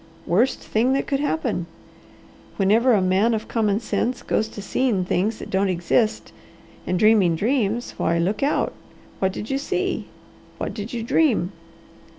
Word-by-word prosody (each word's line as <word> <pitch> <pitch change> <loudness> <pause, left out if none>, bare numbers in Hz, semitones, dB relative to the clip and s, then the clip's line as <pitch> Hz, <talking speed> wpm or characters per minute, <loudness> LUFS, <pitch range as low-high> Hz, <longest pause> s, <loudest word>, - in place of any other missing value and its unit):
Worst 230 +10 +2
thing 240 +4 +1
that 275 - 0
could 275 - -1
happen! 170 - -1 0.9
Whenever 225 +6 +4
a 200 -4 +3
man 195 +5 +3
of 220 - -5
common 215 -3 +1
sense 245 +1 -2
goes 220 - 0
to 215 - -10
seeing 205 -1 0
things 205 +5 0
that - - -9
don't 195 +1 +1
exist, 185 +5 0 0.6
and 180 - 0
dreaming 205 -5 +4
dreams, 230 - 0
why 170 - +1
look 180 +5 0
out! 280 +2 +1 0.5
What 190 0 +1
did 210 +5 -6
you 270 - 0
see? 375 +5 -2 0.5
What - - -4
did 210 0 -6
you 235 -2 -3
dream?" 230 - +2
215 Hz, 160 wpm, -23 LUFS, 190-245 Hz, 0.9 s, Whenever